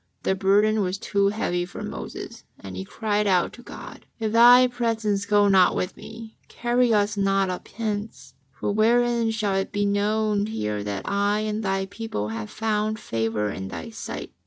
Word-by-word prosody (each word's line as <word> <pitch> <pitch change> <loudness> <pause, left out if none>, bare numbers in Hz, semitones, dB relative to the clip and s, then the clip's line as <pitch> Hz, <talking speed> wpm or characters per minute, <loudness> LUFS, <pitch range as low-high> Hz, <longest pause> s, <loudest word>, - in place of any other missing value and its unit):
The - - +2
burden 205 +3 +3
was 185 0 -1
too 200 0 +1
heavy 200 -4 -1
for 175 - -8
Moses, - - -7 0.2
and 95 -1 -9
he 95 - -4
cried 210 - -1
out 180 -3 +2
to 245 - -12
God: - - -11
"If 220 -2 -2
Thy 245 +2 +8
presence 225 -5 -1
go 205 0 +4
not 190 -2 +5
with 180 - -2
me, 225 0 -11
carry 240 0 +1
us 210 0 +2
not 195 -1 +2
up 180 - -6
hence. 205 - -5 0.2
For 135 - -3
wherein 235 +2 +2
shall 215 -3 -1
it 195 0 -1
be 205 0 0
known 205 +1 +1
here 105 - -3
that 100 -1 -5
I 205 +1 +1
and 215 0 -2
Thy 195 -2 -1
people 200 - -5
have 105 -1 -5
found 215 0 -1
favour 110 - -2
in 95 -1 -6
Thy 80 -4 -7
sight? - - -7
205 Hz, 180 wpm, -24 LUFS, 185-220 Hz, 0.2 s, Thy